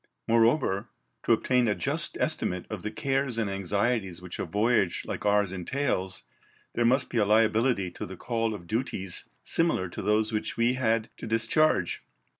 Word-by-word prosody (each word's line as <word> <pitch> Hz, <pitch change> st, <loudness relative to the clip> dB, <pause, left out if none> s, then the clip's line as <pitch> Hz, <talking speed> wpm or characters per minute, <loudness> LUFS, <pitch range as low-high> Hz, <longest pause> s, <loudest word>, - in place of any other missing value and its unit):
Moreover, 115 Hz, -2 st, +2 dB, 0.3 s
to -, -, -1 dB
obtain 125 Hz, +1 st, +3 dB
a 105 Hz, -, +1 dB
just 155 Hz, +4 st, -1 dB
estimate 90 Hz, -, 0 dB
of 105 Hz, -4 st, -4 dB
the 105 Hz, -, -3 dB
cares 135 Hz, 0 st, -1 dB
and 115 Hz, -2 st, 0 dB
anxieties 100 Hz, 0 st, -1 dB
which 90 Hz, -1 st, -8 dB
a -, -, -1 dB
voyage 105 Hz, -3 st, +1 dB
like -, -, -3 dB
ours 105 Hz, -2 st, +3 dB
entails, 95 Hz, -1 st, -2 dB, 0.5 s
there 120 Hz, -, +1 dB
must 130 Hz, +3 st, +3 dB
be 120 Hz, -, +1 dB
a -, -, +4 dB
liability 110 Hz, -1 st, +2 dB
to -, -, -7 dB
the 95 Hz, 0 st, -9 dB
call 115 Hz, -1 st, -1 dB
of 85 Hz, -, -10 dB
duties 95 Hz, -3 st, -2 dB
similar 165 Hz, -, +1 dB
to -, -, -6 dB
those 110 Hz, +1 st, +1 dB
which 105 Hz, -, -2 dB
we 120 Hz, +1 st, +3 dB
had 115 Hz, -3 st, 0 dB
to -, -, -7 dB
discharge. 115 Hz, -, +2 dB
110 Hz, 170 wpm, -28 LUFS, 100-125 Hz, 0.5 s, a